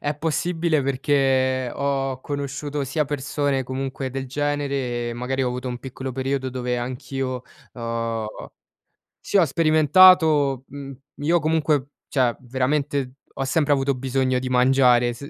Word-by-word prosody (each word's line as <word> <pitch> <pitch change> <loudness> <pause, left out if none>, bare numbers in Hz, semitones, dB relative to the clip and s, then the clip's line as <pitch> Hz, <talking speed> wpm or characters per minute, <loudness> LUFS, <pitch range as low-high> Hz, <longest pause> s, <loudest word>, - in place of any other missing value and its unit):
è 145 +1 -1
possibile 165 0 0
perché 130 -2 +1
ho 135 -2 -1
conosciuto 140 0 -4
sia 150 +3 0
persone 140 -1 -1
comunque 130 0 -4
del 135 0 -4
genere, 135 -4 -2
magari 130 +2 -2
ho 125 - +1
avuto 125 +1 -4
un 120 -1 -4
piccolo 130 0 -6
periodo 135 0 -2
dove 125 -1 -2
anch'io, 130 +1 -4 0.3
ho 115 -2 -4 0.7
Sì, 205 - -1
ho 175 - +6
sperimentato, 155 -2 +5
mhmm, 140 0 -8 0.2
io 165 +4 +2
comunque, 155 -3 +1 0.2
cioè 125 -4 +1
veramente 130 +1 -1 0.2
ho 135 - -2
sempre 145 +1 +1
avuto 135 0 +2
bisogno 130 0 0
di 130 0 -3
mangiare, 125 -1 +4
se 140 +4 -9
135 Hz, 135 wpm, -23 LUFS, 130-145 Hz, 0.7 s, ho